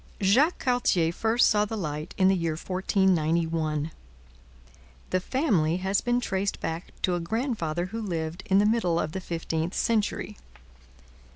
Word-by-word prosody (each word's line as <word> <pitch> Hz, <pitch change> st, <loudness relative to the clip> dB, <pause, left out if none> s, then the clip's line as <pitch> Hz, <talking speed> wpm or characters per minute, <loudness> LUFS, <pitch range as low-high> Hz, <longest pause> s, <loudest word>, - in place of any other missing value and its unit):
Jacques 250 Hz, -, +3 dB
Cartier 220 Hz, -10 st, +1 dB
first 225 Hz, +5 st, +3 dB
saw 210 Hz, -1 st, +3 dB
the 220 Hz, +1 st, -4 dB
light 150 Hz, -4 st, -4 dB
in 185 Hz, -, +4 dB
the 190 Hz, -, +4 dB
year 165 Hz, -3 st, -1 dB
1491. 165 Hz, -4 st, 0 dB, 1.2 s
The 185 Hz, -, +2 dB
family 185 Hz, -, +1 dB
has 190 Hz, +2 st, 0 dB
been 245 Hz, 0 st, +1 dB
traced 200 Hz, -4 st, -2 dB
back 165 Hz, +1 st, -4 dB
to 180 Hz, -, +2 dB
a 175 Hz, -, 0 dB
grandfather 175 Hz, -, -2 dB
who 225 Hz, +5 st, -5 dB
lived 170 Hz, -3 st, -3 dB
in 190 Hz, -, +4 dB
the 205 Hz, -, +4 dB
middle 210 Hz, -7 st, +2 dB
of 155 Hz, -, -2 dB
the 190 Hz, -, -4 dB
fifteenth 165 Hz, 0 st, -3 dB
century. 215 Hz, -2 st, -1 dB
185 Hz, 150 wpm, -27 LUFS, 165-215 Hz, 1.2 s, in